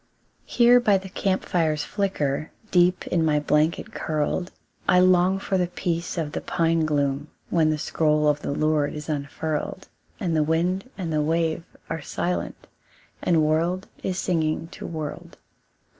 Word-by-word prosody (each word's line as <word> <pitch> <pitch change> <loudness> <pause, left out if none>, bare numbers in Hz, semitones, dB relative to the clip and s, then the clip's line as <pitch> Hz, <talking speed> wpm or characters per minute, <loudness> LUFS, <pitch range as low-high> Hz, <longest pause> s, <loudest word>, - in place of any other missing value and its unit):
Here 245 0 +6
by 210 -5 +4
the 190 0 -8
camp 190 0 -1
fire's 155 -4 +1
flicker, 155 -7 -1 0.2
Deep 180 0 +3
in 170 -2 +2
my 150 -2 +3
blanket 150 +2 +1
curled, 155 +4 -1 0.4
I 180 - +6
long 185 +1 +4
for 195 -1 -1
the 180 - +1
peace 170 0 -3
of 155 -3 -2
the - - -4
pine 165 -2 +1
gloom, 145 -1 0 0.2
When 160 -3 +3
the 155 - +1
scroll 150 0 +1
of 150 0 +2
the - - -4
Lord 150 0 +1
is 150 +1 -7
unfurled, 150 +4 -3 0.3
And 175 -6 -1
the 155 - +3
wind 175 +8 0
and 170 -5 -3
the 155 - +2
wave 165 +1 0 0.2
are 160 -1 -4
silent, 180 +4 -3 0.6
And 165 -3 +3
world 170 +5 +1
is 185 -1 -2
singing 165 -3 0
to - - -8
world. 155 -3 -6
165 Hz, 160 wpm, -25 LUFS, 155-180 Hz, 0.6 s, Here